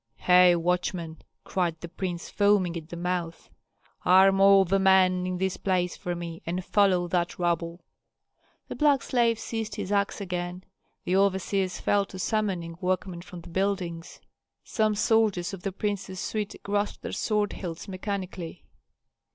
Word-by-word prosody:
"Hei, 180 -1 +6
watchman!" 170 -1 -2 0.2
cried 170 -3 -1
the 170 - -7
prince, 175 0 -5
foaming 200 -4 +2
at 160 -1 -7
the - - -6
mouth, 175 -1 -4 0.5
"arm 195 +1 +6
all 195 0 +7
the 195 +2 +1
men 185 -1 +4
in 185 0 -2
this 190 0 -1
place 180 -2 0
for 175 0 -4
me 170 -1 -7
and 175 +2 -3
follow 190 -4 +3
that 175 -1 -1
rabble!" 170 0 -1 0.9
The - - -5
black 290 -3 +3
slave 235 -2 +2
seized 225 -2 -4
his 205 -2 -5
axe 200 0 0
again, 180 -1 -4 0.4
the 180 - +1
overseers 190 -1 +1
fell 200 -1 +2
to 190 - -10
summoning 185 -5 -2
workmen 185 -1 -2
from 175 -1 -10
the - - -13
buildings, 185 -3 -2 0.4
some 215 -1 0
soldiers 210 -4 +2
of 190 - -7
the 195 - -3
prince's 195 -1 -3
suite 210 0 -3
grasped 205 +1 -2
their - - -4
sword 210 -2 0
hilts 170 0 -6
mechanically. 185 -3 -5
185 Hz, 150 wpm, -27 LUFS, 175-200 Hz, 0.9 s, all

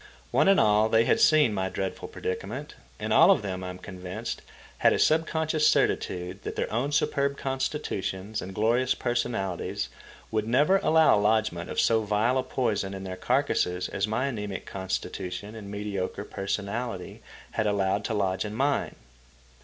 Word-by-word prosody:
One - - +3
and 195 -1 +6
all, 105 +1 +4
they 115 +1 +4
had - - +3
seen 150 -7 +5
my 95 -1 -1
dreadful 95 0 -4
predicament; 110 +10 -5 0.3
and - - -1
all - - +7
of - - +4
them, 95 -2 -4
I 90 - -4
am 90 - -7
convinced, 90 -1 -6 0.4
had - - +5
a - - +1
subconscious 155 -1 +2
certitude 90 -6 0
that - - -5
their - - -2
own 125 +6 0
superb 140 -1 +1
constitutions 120 -7 -3
and 95 +1 -7
glorious 120 +4 +2
personalities 115 -7 -2 0.4
would 110 0 0
never 145 +11 +4
allow 160 - +4
lodgment 105 -5 +1
of - - -2
so 115 -1 +3
vile 110 +5 +1
a - - +2
poison 105 -7 -1
in 95 - -7
their 95 -1 -5
carcasses 95 -6 0
as 100 +1 -1
my 110 +5 0
anæmic 105 -7 -4
constitution 95 +1 -4
and 105 -3 -9
mediocre 100 -2 -4
personality 100 +1 -4 0.3
had 110 -1 0
allowed 100 0 +1
to 110 - -1
lodge 95 -2 0
in 105 0 -5
mine. 140 +4 0
105 Hz, 160 wpm, -27 LUFS, 95-130 Hz, 0.4 s, all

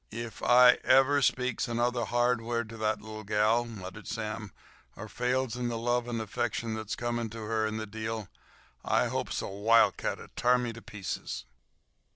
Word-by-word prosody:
"Ef 115 +1 -6
I 125 0 +7
ever 135 +2 +5
speaks 125 -2 +1
another 120 0 0
hard 120 0 +2
word 115 -1 -2
to 115 - -9
ther 110 0 +1
little 110 0 -9
gal," 105 +3 +2
muttered 105 -2 -9
Sam, 110 -2 -4 0.4
"or - - -8
fails 125 0 -1
in 125 -1 -2
the 120 -1 -2
love 120 +1 0
and 120 -1 -2
affection 115 +1 -2
that's 110 -1 -4
coming 120 -1 -2
to 115 +1 -8
her 110 0 0
in 110 0 -3
the 110 - -3
deal, 110 0 -4 0.6
I - - +2
hopes - - -2
a - - -3
wildcat'll 105 +4 +2
t'ar 125 +1 +4
me 120 -2 -2
to 115 - -10
pieces." 90 - -5
115 Hz, 175 wpm, -29 LUFS, 110-120 Hz, 0.6 s, I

